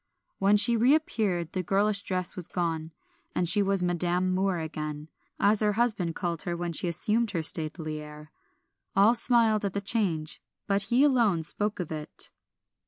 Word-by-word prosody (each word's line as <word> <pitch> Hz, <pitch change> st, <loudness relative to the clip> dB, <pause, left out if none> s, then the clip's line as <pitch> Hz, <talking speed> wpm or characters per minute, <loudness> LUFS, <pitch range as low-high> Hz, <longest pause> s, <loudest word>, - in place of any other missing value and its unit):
When 200 Hz, +2 st, +4 dB
she 225 Hz, +3 st, +7 dB
reappeared 220 Hz, -, +1 dB
the 185 Hz, -, -1 dB
girlish 200 Hz, +3 st, +1 dB
dress 185 Hz, -2 st, -3 dB
was 180 Hz, -3 st, -5 dB
gone, 165 Hz, -2 st, -3 dB, 0.4 s
and 175 Hz, -, 0 dB
she 205 Hz, +4 st, +4 dB
was 195 Hz, -2 st, +1 dB
Madam 180 Hz, +1 st, 0 dB
Moor 190 Hz, 0 st, 0 dB
again, 155 Hz, -1 st, -5 dB, 0.3 s
as 205 Hz, +1 st, +3 dB
her 210 Hz, -1 st, +2 dB
husband 205 Hz, -7 st, 0 dB
called 170 Hz, -3 st, -2 dB
her 175 Hz, -1 st, -3 dB
when 175 Hz, -1 st, -3 dB
she 175 Hz, -, -2 dB
assumed 210 Hz, +7 st, 0 dB
her 170 Hz, -5 st, -2 dB
stately 155 Hz, -1 st, -1 dB
air. 150 Hz, 0 st, -12 dB, 0.6 s
All 200 Hz, +4 st, +5 dB
smiled 230 Hz, -3 st, +2 dB
at 200 Hz, -2 st, -2 dB
the 200 Hz, -, -1 dB
change, 195 Hz, -7 st, -2 dB, 0.2 s
but 200 Hz, 0 st, +1 dB
he 250 Hz, +3 st, +4 dB
alone 230 Hz, -, +2 dB
spoke 205 Hz, +6 st, -1 dB
of 175 Hz, -3 st, -5 dB
it. 155 Hz, -1 st, -5 dB
185 Hz, 170 wpm, -27 LUFS, 165-210 Hz, 0.6 s, she